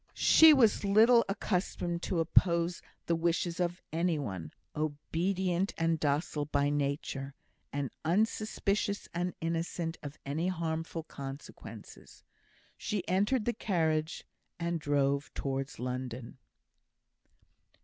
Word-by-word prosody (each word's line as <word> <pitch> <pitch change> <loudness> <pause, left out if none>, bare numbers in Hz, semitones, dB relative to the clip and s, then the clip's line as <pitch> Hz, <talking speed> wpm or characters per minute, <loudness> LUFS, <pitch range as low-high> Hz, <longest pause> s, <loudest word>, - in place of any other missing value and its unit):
She 320 0 +8
was 245 -9 +4
little 225 +4 +6
accustomed 180 -3 -1
to 175 - -1
oppose 170 +1 +3 0.2
the 170 - +1
wishes 170 +1 0
of 175 0 -1
any 170 0 +1
one 95 - -5 0.2
obedient 175 +5 -1
and 165 -1 +1
docile 150 0 0
by 145 0 +1
nature, 140 -1 -2 0.4
and 140 -3 -2
unsuspicious 205 +2 0
and 175 +1 -2
innocent 165 0 -2
of 145 0 -8
any 155 +5 -1
harmful 165 -2 -2
consequences. 140 -2 -10 0.5
She 205 -4 -3
entered 205 +6 +2
the 240 - +1
carriage, 160 -7 0 0.4
and 170 0 -1
drove 140 -1 +1
towards 135 0 -3
London. 125 -1 -5
165 Hz, 110 wpm, -31 LUFS, 145-180 Hz, 0.5 s, She